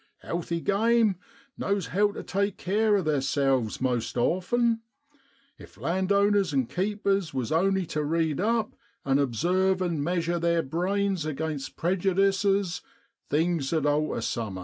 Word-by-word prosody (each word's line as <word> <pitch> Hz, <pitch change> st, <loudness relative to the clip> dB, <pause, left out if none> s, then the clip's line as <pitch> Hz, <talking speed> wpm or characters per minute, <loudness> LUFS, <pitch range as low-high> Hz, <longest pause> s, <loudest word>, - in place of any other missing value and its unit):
Healthy 170 Hz, 0 st, -3 dB
game 220 Hz, +1 st, +2 dB, 0.4 s
knows 200 Hz, -3 st, -1 dB
how 205 Hz, +2 st, +3 dB
tu -, -, -7 dB
take 200 Hz, 0 st, -1 dB
care 210 Hz, +3 st, +2 dB
of 190 Hz, -4 st, 0 dB
theerselves 135 Hz, -5 st, +1 dB
most 125 Hz, -2 st, -1 dB
often; 225 Hz, -, +1 dB, 0.8 s
if -, -, -14 dB
landowners 200 Hz, +1 st, +2 dB
an' 135 Hz, -3 st, +1 dB
keepers 195 Hz, -, -1 dB
was 125 Hz, -4 st, -2 dB
only 190 Hz, +3 st, +2 dB
tu 155 Hz, -2 st, -3 dB
read 160 Hz, 0 st, 0 dB
up 220 Hz, +2 st, 0 dB, 0.3 s
and 135 Hz, 0 st, +2 dB
obsarve 180 Hz, -, +1 dB
and 170 Hz, -5 st, -1 dB
measure 170 Hz, +1 st, 0 dB
theer 170 Hz, 0 st, +1 dB
brains 190 Hz, +4 st, -1 dB
aginst 155 Hz, -2 st, -4 dB
prejudices, 195 Hz, +1 st, +1 dB, 0.5 s
things 160 Hz, -2 st, 0 dB
'ud 160 Hz, -3 st, +1 dB
alter 145 Hz, -3 st, 0 dB
summat. 110 Hz, -5 st, -3 dB
175 Hz, 130 wpm, -27 LUFS, 150-200 Hz, 0.8 s, how